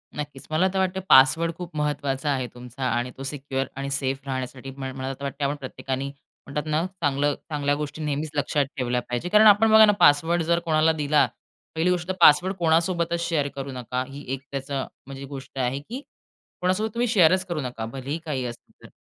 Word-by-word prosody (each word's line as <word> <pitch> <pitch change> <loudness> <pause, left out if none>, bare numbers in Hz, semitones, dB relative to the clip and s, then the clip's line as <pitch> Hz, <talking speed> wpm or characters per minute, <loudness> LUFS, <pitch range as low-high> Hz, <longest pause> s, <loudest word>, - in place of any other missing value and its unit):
नक्कीच. 145 -2 -7
मला 160 +4 +3
तर 190 - 0
वाटते 190 0 0
पासवर्ड 135 +6 +6
खूप 175 -2 -8
महत्वाचा 145 -1 -1
आहे 130 -2 -1
तुमचा 125 +2 -9
आणि 120 +1 -1
तो 135 - -7
सिक्युअर 135 -1 -3
आणि 140 +1 -4
सेफ 135 -1 -1
राहण्यासाठी 130 0 -5
म 135 - -6
मला 135 0 -4
तर 140 - -11
वाटते 140 +1 -4
आपण 140 +1 0
प्रत्येकाने 135 0 -4 0.4
म्हणतात 145 +2 -4
ना 160 +3 +1 0.2
चांगलं 145 0 +1
चांगल्या 145 -1 0
गोष्टी 150 +1 -5
नेहमीच 150 +1 -2
लक्षात 145 0 +1
ठेवल्या 125 -1 0
पाहिजे 120 +9 -4
कारण 215 +3 +7
आपण 215 +2 +6
बघा 220 0 +9
ना 210 - +5
पासवर्ड 165 +4 +4
जर 170 +1 +2
कोणाला 160 0 +3
दिला, 150 -1 +3 0.5
पहिली 160 +3 +2
गोष्ट 175 -1 0
तर 185 - -1
पासवर्ड 175 +4 +6
कोणासोबतच 170 0 +1
शेअर 150 -4 0
करू 135 0 -5
नका. 125 0 -3
ही 140 +1 -9
एक 135 - -4
त्याचं 135 -1 -3 0.2
म्हणजे 135 0 -7
गोष्ट 135 0 -10
आहे, 130 +2 0
की 235 - -7 0.6
कोणासोबत 185 +5 +1
तुम्ही 240 +1 0
शेअरच 185 -4 +4
करू 170 -4 -3
नका. 120 -4 -5
भलेही 135 +5 -4
काही 140 -5 -2
असतं 120 -1 -8
तर. - - -11
145 Hz, 195 wpm, -25 LUFS, 135-165 Hz, 0.6 s, बघा